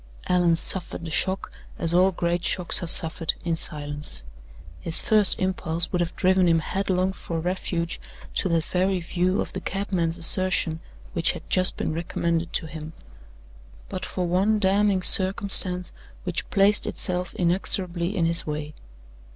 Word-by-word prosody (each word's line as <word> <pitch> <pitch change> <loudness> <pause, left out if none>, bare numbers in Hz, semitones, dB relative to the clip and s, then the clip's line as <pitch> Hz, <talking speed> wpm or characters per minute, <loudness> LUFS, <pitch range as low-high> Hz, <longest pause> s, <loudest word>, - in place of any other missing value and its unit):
Allan 175 -2 +2
suffered 170 0 +1
the 160 - -6
shock, 190 +3 +1 0.3
as 165 0 0
all 185 +2 +4
great 175 0 -2
shocks 180 0 +2
are 175 - -4
suffered, 165 0 +4
in 170 -1 0
silence. 145 - -6 0.6
His 165 - -1
first 210 -3 +4
impulse 175 -3 -1
would 180 - -1
have 170 - -3
driven 185 -1 +2
him 165 -1 +3
headlong 185 +2 -1
for 165 -3 -6
refuge 170 -1 -3 0.3
to 190 - -1
that 165 -1 +1
very 185 +2 -1
view 180 +2 -1
of - - -6
the - - -5
cabman's 185 -4 -2
assertion 170 -2 -1 0.3
which - - +1
had - - -11
just 185 0 +2
been - - -3
recommended 170 0 -2
to - - 0
him, 155 0 -9 1.0
but 185 -1 -6
for 185 -1 -3
one 190 +5 +1
damning 200 -1 +1
circumstance 185 -2 +4 0.3
which 180 -2 -4
placed 200 +1 +3
itself 180 -1 -2
inexorably 180 +1 0
in 170 - +1
his 165 0 +1
way. 150 0 -5
180 Hz, 150 wpm, -24 LUFS, 165-190 Hz, 1.0 s, all